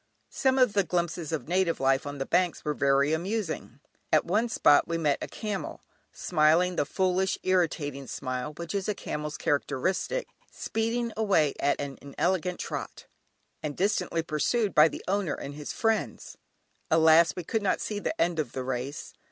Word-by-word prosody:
Some 265 Hz, 0 st, +1 dB
of 250 Hz, -5 st, +4 dB
the 200 Hz, -, +3 dB
glimpses 175 Hz, -3 st, -2 dB
of 160 Hz, -2 st, -3 dB
native 180 Hz, -1 st, +1 dB
life 135 Hz, +1 st, +2 dB
on 145 Hz, 0 st, -5 dB
the 135 Hz, -, -3 dB
banks 180 Hz, -3 st, 0 dB
were 150 Hz, -, 0 dB
very 140 Hz, +1 st, +2 dB
amusing. 175 Hz, -, -3 dB, 0.3 s
At 155 Hz, -, +4 dB
one 215 Hz, +7 st, +1 dB
spot 145 Hz, -9 st, +4 dB
we 165 Hz, -, -1 dB
met 150 Hz, -4 st, +1 dB
a -, -, -3 dB
camel, 210 Hz, -3 st, -5 dB, 0.3 s
smiling 170 Hz, +2 st, +2 dB
the 145 Hz, -, 0 dB
foolish 190 Hz, +2 st, +1 dB
irritating 150 Hz, -7 st, 0 dB
smile 130 Hz, +3 st, -4 dB
which 170 Hz, +2 st, -5 dB
is 200 Hz, 0 st, -2 dB
a 210 Hz, -, 0 dB
camel's 150 Hz, -3 st, -5 dB
characteristic, 185 Hz, -, -1 dB, 0.2 s
speeding 230 Hz, +1 st, -2 dB
away 190 Hz, -10 st, +2 dB
at 140 Hz, -, +1 dB
an 140 Hz, -1 st, -5 dB
inelegant 180 Hz, +5 st, -1 dB
trot, -, -, -5 dB, 0.6 s
and 150 Hz, -2 st, -4 dB
distantly 185 Hz, -4 st, 0 dB
pursued 190 Hz, +7 st, 0 dB
by 150 Hz, +1 st, +7 dB
the -, -, -7 dB
owner 195 Hz, -4 st, 0 dB
and 140 Hz, -, -7 dB
his 150 Hz, 0 st, -6 dB
friends; 225 Hz, -1 st, -1 dB, 0.5 s
alas! 160 Hz, 0 st, +5 dB
we 180 Hz, -, -5 dB
could 220 Hz, +6 st, -1 dB
not 200 Hz, -, +1 dB
see 210 Hz, -1 st, -3 dB
the 215 Hz, -, -3 dB
end 170 Hz, -1 st, +1 dB
of 145 Hz, -6 st, -2 dB
the 130 Hz, -, -3 dB
race. 130 Hz, +3 st, -4 dB
165 Hz, 170 wpm, -28 LUFS, 145-195 Hz, 0.6 s, by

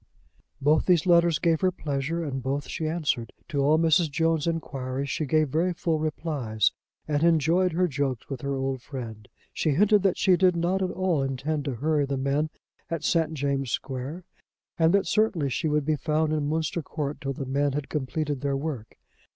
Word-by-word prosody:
Both 150 Hz, +2 st, +3 dB
those 180 Hz, -3 st, +4 dB
letters 170 Hz, -2 st, +4 dB
gave 165 Hz, -1 st, +1 dB
her 185 Hz, -1 st, +3 dB
pleasure, 155 Hz, 0 st, -2 dB
and 135 Hz, -4 st, -3 dB
both 140 Hz, +3 st, -2 dB
she 160 Hz, -, -3 dB
answered. 150 Hz, -8 st, -1 dB, 0.2 s
To 145 Hz, -4 st, -1 dB
all 145 Hz, +3 st, +4 dB
Mrs. 165 Hz, 0 st, +3 dB
Jones' 160 Hz, +1 st, +1 dB
enquiries 135 Hz, -4 st, -3 dB
she 155 Hz, -, -2 dB
gave 155 Hz, 0 st, +2 dB
very 170 Hz, +6 st, +1 dB
full 165 Hz, -2 st, -1 dB
replies, 145 Hz, -, 0 dB, 0.4 s
and 150 Hz, -1 st, 0 dB
enjoyed 170 Hz, +2 st, +3 dB
her 180 Hz, +2 st, +2 dB
jokes 140 Hz, -5 st, -2 dB
with 135 Hz, -3 st, -5 dB
her 140 Hz, 0 st, -2 dB
old 135 Hz, -1 st, -2 dB
friend. 115 Hz, -6 st, -8 dB, 0.3 s
She 160 Hz, -, 0 dB
hinted 210 Hz, +3 st, +4 dB
that 195 Hz, -1 st, +2 dB
she 190 Hz, -3 st, +4 dB
did 180 Hz, 0 st, +4 dB
not 175 Hz, +3 st, 0 dB
at 185 Hz, -, 0 dB
all 180 Hz, -5 st, 0 dB
intend 135 Hz, +3 st, -2 dB
to 135 Hz, -4 st, -2 dB
hurry 145 Hz, +3 st, +1 dB
the 140 Hz, 0 st, -2 dB
men 140 Hz, +3 st, 0 dB, 0.4 s
at 165 Hz, -2 st, -3 dB
St. 160 Hz, -2 st, +1 dB
James' 140 Hz, -2 st, -1 dB
Square, 135 Hz, +9 st, -4 dB, 0.6 s
and 160 Hz, 0 st, +5 dB
that 200 Hz, -, +2 dB
certainly 195 Hz, -11 st, +1 dB
she 155 Hz, -, -1 dB
would 150 Hz, -1 st, +1 dB
be 155 Hz, 0 st, +1 dB
found 155 Hz, +1 st, 0 dB
in 150 Hz, -2 st, 0 dB
Munster 160 Hz, +1 st, -1 dB
Court 150 Hz, -1 st, -4 dB
till 135 Hz, 0 st, -2 dB
the 135 Hz, -, -5 dB
men 140 Hz, +1 st, 0 dB
had 145 Hz, -1 st, -3 dB
completed 145 Hz, -1 st, -2 dB
their 140 Hz, -1 st, 0 dB
work. 135 Hz, -7 st, -5 dB
150 Hz, 190 wpm, -26 LUFS, 140-165 Hz, 0.6 s, and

